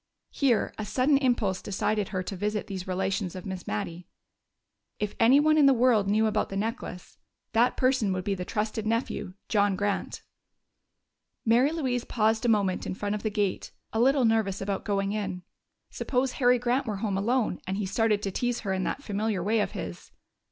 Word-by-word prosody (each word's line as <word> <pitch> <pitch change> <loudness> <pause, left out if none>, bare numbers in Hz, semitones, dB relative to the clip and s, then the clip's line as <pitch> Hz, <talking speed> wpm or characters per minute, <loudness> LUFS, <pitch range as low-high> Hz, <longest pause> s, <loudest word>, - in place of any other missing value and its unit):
Here 255 -6 +1
a - - -2
sudden 255 +7 +2
impulse 235 -8 +1
decided 205 +1 -1
her 185 -2 -3
to 195 - -5
visit 210 +2 -2
these 190 -2 -6
relations 190 0 -1
of 185 - -7
Miss 190 -2 -6
Mattie. 165 +12 -4 0.9
If 210 -1 -2
anyone 290 +7 +5
in 285 - +7
the 270 - +6
world 235 -4 +3
knew 215 +2 +3
about 215 -1 0
the 195 - -4
necklace, 215 -4 -5 0.3
that 235 +2 +3
person 255 -6 +2
would 185 -1 -2
be 200 0 0
the 180 -2 -4
trusted 215 +2 -2
nephew, 220 -4 -2
John 205 -2 +2
Grant. 205 +1 -2 1.2
Mary 240 +6 +4
Louise 260 -7 -1
paused 220 +1 +1
a - - +3
moment 200 -4 +1
in - - -3
front 205 +1 -2
of 210 - -3
the 215 - -1
gate, 205 -3 -2 0.2
a 220 - 0
little 265 +1 +4
nervous 220 -4 +1
about 195 0 -3
going 200 -1 0
in. 195 -4 -3 0.5
Suppose 255 0 -1
Harry 250 -1 +3
Grant 245 +2 0
were 210 -2 -2
home 200 -2 -1
alone 225 +1 0
and 190 +1 -2
he 205 - -1
started 210 +1 +1
to 195 - -1
tease 245 +4 -1
her 195 -3 -2
in 190 0 -1
that 280 - -3
familiar 205 -4 -1
way 220 +3 +2
of 205 - -1
his! 85 -1 -7
210 Hz, 190 wpm, -27 LUFS, 195-240 Hz, 1.2 s, in